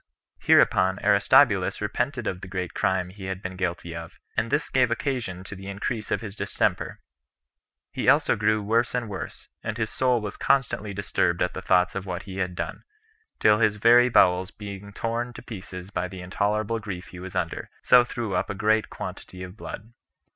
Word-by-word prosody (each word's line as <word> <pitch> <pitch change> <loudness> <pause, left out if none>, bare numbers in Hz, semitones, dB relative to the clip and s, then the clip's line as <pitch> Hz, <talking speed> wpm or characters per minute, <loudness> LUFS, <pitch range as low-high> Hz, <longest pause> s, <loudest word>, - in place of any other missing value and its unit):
Hereupon 95 0 +4
Aristobulus - - +4
repented 130 -4 -2
of 90 -3 -3
the - - -7
great 90 -1 -4
crime 95 -1 0
he 95 0 -9
had 95 -1 -3
been 95 -1 -6
guilty 85 -2 -3
of, 85 -1 -8 0.2
and 115 - 0
this 145 +4 0
gave 130 -2 +3
occasion 115 -7 -2
to 95 - -8
the 95 +1 -10
increase 105 +3 -3
of - - 0
his 105 -3 -7
distemper. - - -1 0.9
He - - +1
also - - +4
grew 105 0 +1
worse 115 +4 +1
and 120 -2 -1
worse, 95 -3 -7
and 110 -1 -4
his 110 -2 -2
soul 125 -2 +2
was 105 -2 -6
constantly 135 -6 +1
disturbed 90 -3 0
at 90 - -1
the 95 - -5
thoughts 90 -1 +3
of 95 0 -5
what 90 0 -4
he 95 -1 -8
had 90 -2 -2
done, - - -4 0.6
till 105 0 +4
his 110 -2 +3
very 120 +3 +6
bowels 90 -4 +4
being 100 -1 -8
torn 115 +3 -3
to - - -10
pieces 95 -3 -8
by 90 - -2
the 90 0 -9
intolerable 105 +4 -1
grief 95 -3 -7
he 90 - -10
was 95 +1 -8
under, 90 -3 -2 0.2
he 125 -1 +8
threw 120 -4 -4
up - - 0
a 100 - -3
great 110 +2 +2
quantity 95 0 -7
of 90 +1 -9
blood. 110 +1 -8
100 Hz, 190 wpm, -26 LUFS, 95-115 Hz, 0.9 s, he